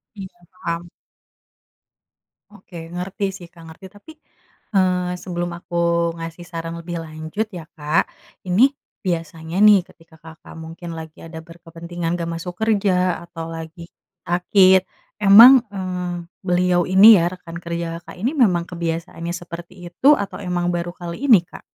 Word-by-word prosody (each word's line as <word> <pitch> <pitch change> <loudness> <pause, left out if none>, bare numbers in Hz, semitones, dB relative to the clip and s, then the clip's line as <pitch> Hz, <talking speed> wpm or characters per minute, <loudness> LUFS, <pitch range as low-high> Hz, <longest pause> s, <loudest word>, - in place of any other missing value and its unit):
Iya, 195 -2 -7 0.2
paham. 170 -2 -4 1.7
Oke, 185 -2 -13 0.2
ngerti 185 +3 -4
sih, 175 -3 -12
Kak. 170 - -15
Ngerti. 160 +4 -13
Tapi, 205 +10 -14 0.6
eee, 180 -1 +1
sebelum 175 -1 -4
aku 175 0 -4 0.4
ngasih 165 +1 -8
saran 165 -1 -6
lebih 170 0 -6
lanjut, 160 +7 -5
ya 175 -4 -8
Kak. 150 0 0 0.4
Ini, 225 +10 +4 0.3
biasanya 165 -1 -3
nih, 205 -3 +6
ketika 165 -2 -21
Kakak 160 +1 -14
mungkin 165 +1 -8
lagi 160 -1 -10
ada 160 0 -9
berkepentingan 170 0 -6
enggak 170 -1 -4
masuk 175 +2 -6
kerja, 195 -4 +1
atau 165 -1 -7
lagi 165 +1 -9 0.3
sakit. 185 +1 +4 0.3
Emang, 225 +6 +9
eee, 180 -2 -4 0.3
beliau 180 -1 +1
ini 200 +3 +8
ya 170 - +1
rekan 170 -2 -9
kerja 170 -1 -5
Kakak 170 - -13
ini 255 - +1
memang 175 -5 +2
kebiasaannya 170 0 -5
seperti 175 0 -9 0.2
itu, 280 +11 +5
atau 200 -5 -5
emang 175 -2 -1
baru 175 0 -4
kali 175 +10 -6
ini, 210 -10 +6
Kak? - - -14
175 Hz, 140 wpm, -21 LUFS, 165-185 Hz, 1.7 s, Emang